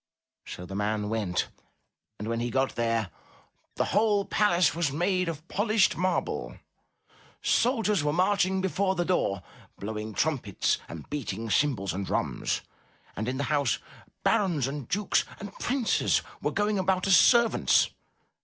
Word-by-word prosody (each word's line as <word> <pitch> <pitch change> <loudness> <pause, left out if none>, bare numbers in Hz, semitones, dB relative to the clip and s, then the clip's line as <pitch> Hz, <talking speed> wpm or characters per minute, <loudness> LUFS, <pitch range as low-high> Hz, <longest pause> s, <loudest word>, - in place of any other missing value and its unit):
So 90 - -7
the 95 - -9
man 105 +1 -1
went, 105 -5 -1 0.7
and 105 - -6
when 115 0 -1
he 120 +1 -1
got 130 +3 0
there, 115 -5 0 0.6
the - - +1
whole 205 -1 +3
palace 185 -4 +3
was 165 -4 0
made 180 +3 0
of 160 0 -7
polished 215 +1 +2
marble, 185 +1 -2 0.9
soldiers 225 - +2
were 150 - +1
marching 190 +2 +2
before 190 +1 0
the 175 -1 0
door, 100 - 0 0.3
blowing 110 +1 -5
trumpets 135 - 0
and 80 -3 -8
beating 115 -6 -4
cymbals 115 -10 +1
and 100 +2 -3
drums, - - -1 0.5
and 110 +3 -3
in 130 +1 -2
the 140 - -1
house 140 -5 +2 0.5
barons 170 -10 +2
and 135 -2 -5
dukes 205 +2 +1 0.2
and 205 -1 -8
princes 250 -2 +1 0.2
were - - 0
going 205 -1 0
about 185 0 +1
as 195 -1 +6
servants. 235 +2 +4
155 Hz, 145 wpm, -28 LUFS, -, 0.9 s, as